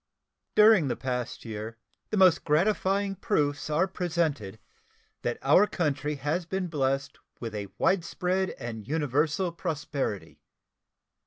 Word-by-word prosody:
During 210 -7 +6
the 125 - -1
past 125 -2 -4
year 110 0 -6 0.3
the 215 - -1
most 185 -3 +5
gratifying 195 +4 +1
proofs 150 -7 -1
are 160 +5 +3
presented 160 - -2 0.6
that 120 - -2
our 180 +9 +5
country 150 -5 -1
has 150 +6 -1
been 190 -1 -2
blessed 135 -2 -1 0.2
with 115 -2 -5
a 105 -1 -4
widespread 185 0 +1
and 115 -4 -7
universal 155 +4 0
prosperity. 150 - -4
150 Hz, 115 wpm, -28 LUFS, 130-185 Hz, 0.6 s, During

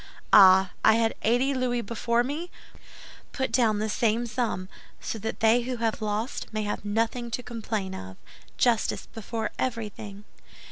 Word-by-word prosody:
Ah, 190 -1 +8
I 220 - +6
had 225 0 +2
eighty 245 +5 +2
louis 250 -2 0
before 235 +2 0
me; 300 +7 -4 0.8
put 265 -1 -2
down 225 -4 +3
the 215 +1 -1
same 225 +2 +1
sum, 220 -5 -2 0.3
so 225 - -5
that 220 +2 -5
they 225 +2 +5
who 250 +1 -4
have 225 -1 -1
lost 215 +4 -3
may 215 -1 -2
have 205 -1 -3
nothing 230 +3 -1
to 245 +2 -4
complain 220 -5 -4
of. 95 - -8 0.4
Justice 235 -3 +1
before 225 0 -5
everything." 210 -4 -4
225 Hz, 150 wpm, -26 LUFS, 210-240 Hz, 0.8 s, Ah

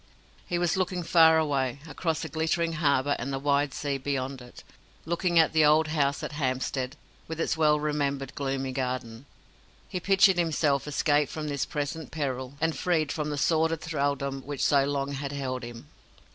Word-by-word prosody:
He 175 - -1
was 175 +1 +1
looking 180 -1 -1
far 160 -1 +6
away 140 -4 0
across 160 +1 -2
the - - -4
glittering 165 +1 0
harbour 145 -3 +2
and 130 +3 -3
the 135 - -1
wide 140 0 +1
sea 140 0 -3
beyond 135 -1 -3
it 125 0 -13 0.4
looking 170 +1 0
at 160 -1 +5
the 160 -1 +4
old 155 +1 +4
house 140 -3 0
at - - -4
Hampstead, 130 -1 -2 0.3
with 160 0 -6
its 165 - 0
well 150 -2 +3
remembered 140 -2 -2
gloomy 135 -1 -2
garden. 125 -1 -4 0.6
He 180 - -4
pictured 190 0 +4
himself 150 -4 +1
escaped 145 0 +1
from 155 -1 -4
this 140 -2 -2
present 150 +1 -4
peril, 130 -3 -4
and 160 0 0
freed 160 -4 0
from 150 -1 -2
the 145 - -3
sordid 160 +1 +1
thraldom 140 -3 -2
which 140 0 -3
so 140 -1 +4
long 140 0 -2
had 140 0 -4
held 130 -3 -3
him. 115 0 -9
145 Hz, 175 wpm, -27 LUFS, 135-160 Hz, 0.6 s, far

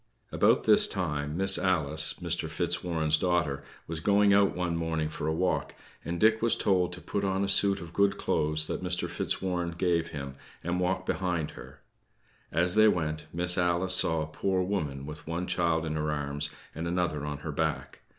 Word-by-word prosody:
About - - +3
this - - +5
time, 75 -4 -3
Miss 95 +1 +4
Alice, 80 -4 +1
Mr. - - -3
Fitzwarren's 80 -3 0
daughter, 85 -6 0 0.2
was 80 0 -5
going 100 +3 +3
out 100 0 +3
one 90 -2 -1
morning 80 -2 -2
for 75 -1 -5
a - - +1
walk, 90 +3 -1 0.3
and 85 0 -4
Dick 110 +1 +4
was 115 0 +3
told 90 -3 +1
to 90 - -4
put 100 - -3
on 95 0 0
a - - 0
suit 100 0 +5
of 85 0 -10
good 100 +1 +2
clothes 75 +1 +1
that - - -4
Mr. 90 0 -1
Fitzwarren 90 -2 -2
gave 85 -2 +1
him, 70 -4 -7 0.3
and 85 +2 -1
walk 95 +1 -1
behind 90 -6 -2
her. - - -13 0.7
As 90 +3 +3
they 110 +1 +6
went, 80 -6 -1
Miss 90 +2 +2
Alice 90 +1 +1
saw 80 -3 +3
a - - -4
poor 95 +4 -1
woman 75 -8 -3
with 75 +2 -9
one 85 +2 -3
child 85 -3 0
in 80 -1 -3
her 75 0 -1
arms 75 -1 -3 0.2
and 80 +2 -4
another 85 -4 -1
on 75 -1 -4
her 80 - -3
back. 80 +1 -3
85 Hz, 190 wpm, -28 LUFS, 80-95 Hz, 0.7 s, they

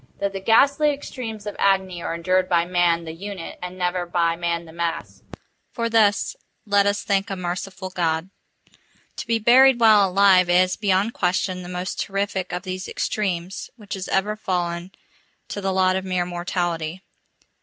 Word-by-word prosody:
That 200 0 -1
the 195 - -4
ghastly 280 +9 +4
extremes 240 -7 -6
of 205 - -5
agony 190 -3 +1
are 165 - -3
endured 185 +2 +1
by 170 -2 +3
man 175 -1 +2
the 160 - -6
unit, 190 0 -7
and 180 +1 -7
never 180 -1 -1
by 170 -1 +1
man 170 0 -2
the 160 - -13
mass——for 170 +7 -6
this 210 -3 +3 0.3
let 200 -1 +3
us 205 +1 0
thank 195 -1 0
a 195 - -3
merciful 185 +1 -5
God! 170 0 -1 0.9
To - - -6
be 230 0 +2
buried 245 +3 +6
while 215 -4 +6
alive 185 -1 +5
is, 185 +1 +3
beyond 200 +2 +1
question, 180 0 -1
the 175 - -9
most 180 +1 -4
terrific 195 -2 -2
of 180 +1 -4
these 185 -1 -5
extremes 190 -3 -3
which 210 -4 -9
has 190 -1 -5
ever 205 +2 0
fallen 175 -3 -3 0.6
to 205 - -5
the 195 0 -1
lot 185 0 +2
of 190 - -2
mere 185 -2 -1
mortality. 175 -1 -3
185 Hz, 165 wpm, -23 LUFS, 175-200 Hz, 0.9 s, buried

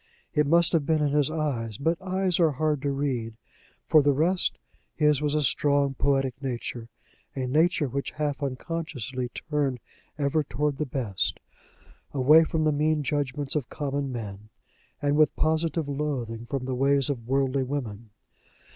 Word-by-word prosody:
It 150 -1 +2
must 170 +2 +4
have 165 -3 +3
been 155 +1 +1
in 145 - +1
his 145 0 +2
eyes, 135 -9 -2
but 165 +5 0
eyes 185 -1 +1
are 160 -3 +4
hard 150 0 0
to 140 - -1
read. 130 -5 -2 0.5
For 155 - +6
the 145 0 +3
rest, 175 +6 +1 0.4
his 150 -2 +3
was 150 0 0
a 150 - +2
strong 140 +1 +2
poetic 135 -1 +1
nature 120 -3 -4 0.5
a 130 -2 -2
nature 155 +3 +2
which 140 +2 -3
half 150 -2 -3
unconsciously 130 -3 -4
turned 140 -2 -2 0.4
ever 150 +1 +1
toward 145 0 -2
the 150 - -1
best, 120 -8 -2 0.8
away 150 +5 +6
from 160 0 -1
the 155 - +3
mean 150 +1 +1
judgments 145 0 -2
of 140 -5 -1
common 140 -1 -3
men, 105 -3 -7 0.5
and 145 0 +2
with 155 -2 +4
positive 160 0 0
loathing 130 -6 -3
from 135 -1 -3
the 130 - -2
ways 135 +1 +2
of 120 -5 -4
worldly 135 0 +1
women. 120 -5 -4
140 Hz, 160 wpm, -26 LUFS, 130-155 Hz, 0.8 s, For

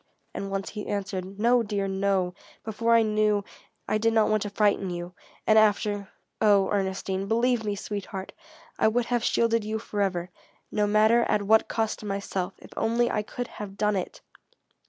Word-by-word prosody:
And 195 - -4
once 195 0 -3
he 210 -1 -6
answered: 195 -1 -4
"No, 240 +3 +4
dear 205 -3 -2
no; 190 -2 0 0.3
before 230 +2 +1
I 230 - +5
knew 215 -1 +2 0.4
I 215 - +1
did 225 +1 +2
not 220 -1 +3
want 215 -1 +2
to 205 - -3
frighten 200 -2 +1
you, 175 0 -5 0.3
and 220 0 +6
after 205 -1 +1 0.3
oh, 200 -2 +4
Ernestine, 195 -1 -1
believe 235 +1 +2
me, 205 -1 -1
sweetheart, 195 -1 -6 0.5
I - - +4
would 235 +2 +1
have 240 -1 0
shielded 230 -2 +2
you 215 +1 -2
forever, 195 -5 -2 0.4
no 210 -1 +1
matter 215 +3 +4
at 210 -1 +2
what 220 +2 +4
cost 220 -1 -1
to 210 - -8
myself 195 -2 -3
if - - -15
only 235 +2 +1
I 210 - 0
could 245 +3 -5
have 200 -1 -7
done 210 -1 +1
it!" 185 - -4
210 Hz, 175 wpm, -26 LUFS, 195-220 Hz, 0.5 s, and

